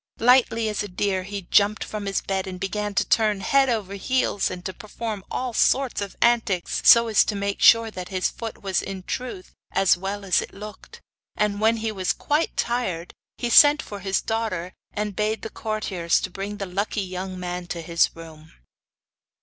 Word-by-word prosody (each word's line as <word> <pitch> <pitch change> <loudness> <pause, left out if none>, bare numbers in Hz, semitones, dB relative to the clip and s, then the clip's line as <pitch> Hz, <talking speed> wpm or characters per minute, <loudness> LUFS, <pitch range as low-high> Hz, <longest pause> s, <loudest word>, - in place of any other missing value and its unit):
Lightly 235 -2 +4
as 210 -1 -2
a 205 - -4
deer 190 0 -1
he 200 +1 -6
jumped 205 +1 +3
from 210 -2 -6
his 195 - -1
bed, 190 0 -2
and 185 -1 -6
began 205 +1 -3
to - - +1
turn 210 -3 +2
head 275 +5 +3
over 210 -5 -2
heels 205 +1 0
and 180 0 -8
to 190 - -4
perform 215 -2 -6
all 250 -2 -3
sorts 260 0 +2
of 200 -1 -5
antics, 230 -7 +1
so 235 0 +8
as 220 -2 +4
to 210 - -2
make 200 0 -3
sure 230 -1 +6
that 185 -3 -7
his 185 -1 0
foot 225 -3 -7
was 190 -2 0
in 190 -1 -6
truth 240 -4 -6 0.2
as 195 -2 +3
well 200 +2 -4
as 185 - +3
it - - -9
looked. 210 +1 -11 0.3
And 210 -1 0
when 225 +1 +3
he 220 0 -2
was 190 -3 -1
quite 300 +3 -1
tired 190 -9 -2 0.2
he 240 -1 -2
sent 295 +3 +7
for 205 - -8
his 195 -1 -1
daughter, 215 -6 -2 0.2
and 210 -1 -3
bade 215 +2 -1
the 220 - -6
courtiers 195 -6 -1
bring 195 +2 -5
the 200 - -4
lucky 200 +3 -2
young 185 0 -6
man 180 0 -5
to 175 - -4
his 170 0 +2
room. 160 -1 -13
205 Hz, 190 wpm, -24 LUFS, 185-225 Hz, 0.3 s, so